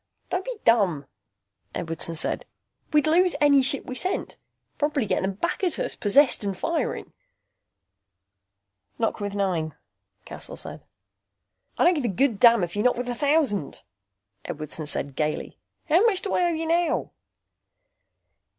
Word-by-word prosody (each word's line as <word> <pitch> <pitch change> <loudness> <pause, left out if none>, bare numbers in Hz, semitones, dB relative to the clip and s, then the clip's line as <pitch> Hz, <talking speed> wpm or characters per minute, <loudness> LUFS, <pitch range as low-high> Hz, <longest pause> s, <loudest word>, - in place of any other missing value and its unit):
"Don't 365 +1 -1
be - - -4
dumb," 195 -11 +3 0.7
Edwardson 165 0 0
said. 155 - +1 0.4
"We'd 300 -1 +3
lose 350 +3 +3
any 285 -2 +5
ship 275 +1 -1
we - - -6
sent. 370 +9 -3 0.4
Probably 290 -4 0
get - - 0
them 190 +1 -1
back 340 - -3
at 355 -4 0
us, - - -3
possessed 245 +4 +3
and 195 -2 -3
firing." - - -2 1.8
"Knock 225 0 -1
with 205 -1 -4
nine," 175 -6 -1 0.5
Cassel - - -7
said. - - -8 0.9
"I - - +3
don't 350 - +5
give 295 -7 -2
a - - +2
good 225 +2 +1
damn 235 -4 +6
if 175 +1 -4
you 205 - 0
knock 250 +2 +3
with 245 0 -3
a - - -1
thousand," 280 - 0 0.6
Edwardson 155 0 -3
said 140 -2 0
gaily. 150 +1 -3 0.3
"How 335 +6 +4
much 390 -5 +1
do 395 - -2
I 360 - +2
owe - - +3
you 325 -1 -2
now?" 335 0 0
245 Hz, 150 wpm, -25 LUFS, 195-320 Hz, 1.8 s, damn